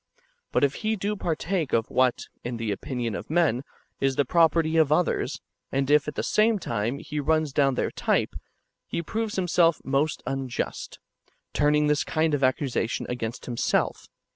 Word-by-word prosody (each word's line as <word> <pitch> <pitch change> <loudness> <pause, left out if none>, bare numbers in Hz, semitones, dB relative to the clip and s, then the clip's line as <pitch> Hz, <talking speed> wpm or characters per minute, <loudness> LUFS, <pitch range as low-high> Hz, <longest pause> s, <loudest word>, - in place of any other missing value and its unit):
But - - +2
if 140 0 +3
he 220 0 +1
do 205 +1 -2
partake 170 -3 -2
of 115 -1 +1
what, 130 -1 +2 0.2
in 120 0 -4
the 115 -2 -2
opinion 120 +3 -3
of - - -6
men, 150 -7 +2 0.4
is 135 -1 +1
the 140 - +2
property 165 +1 +3
of 160 -3 +4
others, 175 +3 +1 0.3
and 135 +1 0
if 150 -1 +4
[at 150 - -4
the - - -2
same 220 +1 +3
time] 115 - -2
he 150 +1 -5
runs 155 0 +1
down 135 -2 +3
their - - -1
type,^ - - 0 0.5
he 170 - -3
proves 220 +4 -3
himself 175 -3 +3
most 140 +3 0
unjust, 135 -2 -4 0.6
turning 150 0 +3
this 150 0 +2
kind 155 0 0
of 140 -2 0
accusation 130 -3 0
against 120 -1 -4
himself. 120 -2 0
145 Hz, 165 wpm, -26 LUFS, 130-165 Hz, 0.6 s, of